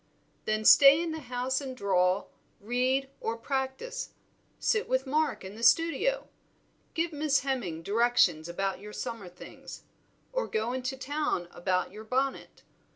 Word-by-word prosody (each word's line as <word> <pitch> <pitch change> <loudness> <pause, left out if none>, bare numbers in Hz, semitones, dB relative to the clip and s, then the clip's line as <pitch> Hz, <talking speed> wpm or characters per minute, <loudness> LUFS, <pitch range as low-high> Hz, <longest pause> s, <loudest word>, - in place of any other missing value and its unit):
"Then 215 0 -1
stay 280 +5 +9
in 335 -1 -2
the 320 - -4
house 255 0 -2
and 260 -2 -6
draw, 185 -2 +2 0.3
read, 255 +5 0
or 225 +1 -3
practise. 270 - -4 0.4
Sit 430 -2 0
with 260 +1 +1
Mark 295 -5 0
in 190 - -8
the 220 - -10
studio; 330 - +3 0.7
give 335 0 -1
Miss 295 -1 +1
Hemming 230 -12 -3
directions 200 -6 +2
about 195 +2 -2
your 210 +1 -10
summer 230 -7 -5
things, 180 - -11 0.5
or - - -1
go 220 +3 -1
into 260 +1 -3
town 280 - -2
about 180 +1 -1
your 210 +2 -10
bonnet. 260 +4 -2
255 Hz, 145 wpm, -29 LUFS, 210-280 Hz, 0.7 s, stay